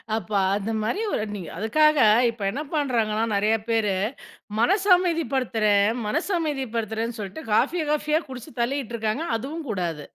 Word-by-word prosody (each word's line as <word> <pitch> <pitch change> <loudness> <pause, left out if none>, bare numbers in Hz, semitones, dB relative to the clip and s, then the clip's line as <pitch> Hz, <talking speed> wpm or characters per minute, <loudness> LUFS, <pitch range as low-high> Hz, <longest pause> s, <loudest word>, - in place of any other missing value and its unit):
அப்போ 210 -1 -3 0.2
அந்த 210 +2 -2
மாதிரி 310 - -1
ஒரு 215 - 0
நீங்க 180 -5 -7
அதுக்காக 305 +9 +3 0.3
இப்போ 225 -3 -6
என்ன 280 +7 -4
பண்ணுறாங்கன்னா, 230 -7 +1
நெறையா 210 +2 +2
பேரு 215 -4 +1 0.6
மனசு 390 - +2
அமைதிப்படுத்துறேன், 250 - +1 0.2
மனசு 310 - -1
அமைதிப்படுத்துறேன்னு 230 -6 -2
சொல்லிட்டு, 205 +10 -6
காஃபியை 315 +8 +2
காஃபியா 300 +1 +1
குடிச்சு 245 -3 -9
தள்ளிட்டு 245 -1 -2
இருக்காங்க. 220 +8 -1
அதுவும் 295 +5 -6
கூடாது. 170 -6 -3
230 Hz, 135 wpm, -24 LUFS, 215-300 Hz, 0.6 s, அதுக்காக